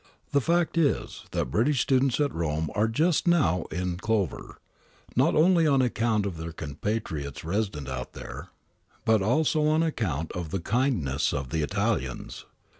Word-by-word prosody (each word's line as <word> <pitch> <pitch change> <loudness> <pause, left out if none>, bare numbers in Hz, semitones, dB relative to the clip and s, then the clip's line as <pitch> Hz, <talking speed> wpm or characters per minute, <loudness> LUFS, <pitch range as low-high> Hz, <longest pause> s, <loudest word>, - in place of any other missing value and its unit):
The 140 - +3
fact 170 +2 +1
is 150 -4 0
that 60 - -2
British 125 - +2
students 130 -1 +2
at 145 -3 +1
Rome 80 -2 -1
are 105 +2 +2
just 155 +10 +1
now 90 - +3
in 90 +1 -2
clever, 105 -2 -2 0.6
not - - +3
only 165 +1 +5
on 140 -2 +4
account 115 -4 +1
of 95 -5 -4
their 80 +1 -5
compatriots 80 -1 -4
resident 85 -5 -2
out 60 -2 -5
there, - - -8 0.6
but 110 -2 +4
also 150 +7 +2
on 155 +1 +3
account 90 - -2
of 85 -3 -5
the 95 - -2
kindness 90 - 0
of 70 -3 -3
the 80 - 0
Italians. 65 -3 -2
105 Hz, 155 wpm, -27 LUFS, -, 0.6 s, only